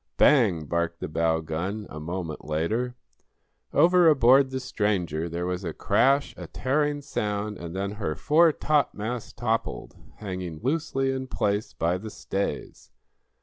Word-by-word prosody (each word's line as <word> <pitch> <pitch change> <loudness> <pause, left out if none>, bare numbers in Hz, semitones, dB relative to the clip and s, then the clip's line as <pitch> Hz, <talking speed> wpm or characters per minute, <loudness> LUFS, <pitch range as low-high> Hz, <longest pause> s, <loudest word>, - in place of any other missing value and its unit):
Bang! 105 - +4
barked 85 +2 -1
the - - -4
bow 80 +1 +1
gun, 90 +7 -4
a 75 - -7
moment 85 0 -5
later. 110 +12 -1 0.8
Over 175 -1 +5
aboard 135 -1 +5
the 130 0 -3
stranger 95 - -1
there 85 +2 -3
was 90 +1 -3
a 85 -3 -3
crash, 140 - +2
a - - -7
tearing 145 +2 0
sound, 105 -4 -3
and 85 0 -7
then 100 +1 -2
her 100 -7 -3
foretopmast 145 -8 +1
toppled, 115 -1 -2 0.2
hanging 90 -5 -6
loosely 135 -1 0
in 130 0 -3
place 105 -3 -1
by 85 -1 0
the 110 +3 -7
stays. 100 -1 -4
105 Hz, 140 wpm, -26 LUFS, 85-130 Hz, 0.8 s, Over